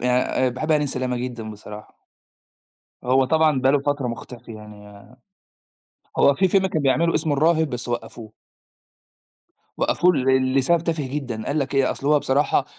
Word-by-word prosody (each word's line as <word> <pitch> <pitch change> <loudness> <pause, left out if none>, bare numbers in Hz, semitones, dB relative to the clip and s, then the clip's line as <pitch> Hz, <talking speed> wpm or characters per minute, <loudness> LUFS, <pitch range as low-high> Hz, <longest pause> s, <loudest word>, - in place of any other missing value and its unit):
يعني 125 +1 +2 0.2
آآ - - +3
باحب 140 +6 -2
هاني 150 -1 +2
سلامة 130 -2 -3
جدًا 120 -3 -5
بصراحة. 105 0 -12 1.1
هو 130 +1 +3
طبعًا 155 -1 +2
بقى 135 +1 +3
له 145 - +3
فترة 140 -2 -2
مختفي 115 0 -8
يعني، 105 -1 -13 1.1
هو 140 - +5
في 190 +6 +2
فيلم 190 +1 +2
كان 160 -5 -2
بيعمله 160 +5 +2
اسمه 155 -3 0
الراهب 160 +1 +2
بس 120 -1 -6
وقّفوه. 115 -2 -6 1.5
وقفوه 180 0 +2
ل 130 -1 +1
لسبب 165 +6 +3
تافه 160 -5 -2
جدًا، 130 -5 -5
قال 150 +2 -1
لك 140 0 -3
إيه، 135 -1 +2
أصل 140 - -5
هو 150 0 +4
بصراحة 140 +2 +1
130 Hz, 160 wpm, -22 LUFS, 120-150 Hz, 1.5 s, هو